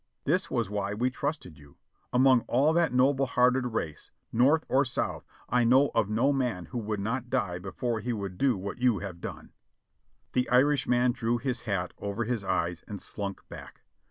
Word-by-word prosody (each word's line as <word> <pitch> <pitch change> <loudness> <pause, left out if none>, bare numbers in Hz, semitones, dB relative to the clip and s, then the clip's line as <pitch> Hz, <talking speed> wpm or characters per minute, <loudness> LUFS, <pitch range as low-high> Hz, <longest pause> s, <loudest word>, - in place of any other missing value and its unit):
This 180 +6 +1
was 120 -4 0
why 100 0 -2
we 125 +4 0
trusted 130 - -4
you. 70 -1 -18 0.3
Among 130 0 +5
all 140 +6 +3
that 170 -1 +2
noble 135 +2 +3
hearted 125 +1 +2
race. 85 -10 -4 0.2
North 140 +7 +4
or 135 +2 +3
South, 120 - -3 0.2
I 125 0 +2
know 130 +4 +4
of 110 -3 +1
no 120 +7 +2
man 125 -10 -1
who 120 - -5
would 105 -2 -3
not 120 +5 -3
die 90 -6 -1
before 110 +5 -3
he 120 +3 -3
would 100 -5 -5
do 130 -6 +2
what 100 +5 -6
you 125 -4 +3
have 90 -3 -7
done!" - - -8 0.8
The 125 0 +1
Irishman 125 -1 +3
drew 120 -1 -1
his 125 +1 -2
hat 90 -3 -1
over 100 +3 -3
his 115 -2 -2
eyes 85 -2 -1
and 100 -2 -6
slunk 100 0 -5
back. - - -11
120 Hz, 185 wpm, -28 LUFS, 100-130 Hz, 0.8 s, Among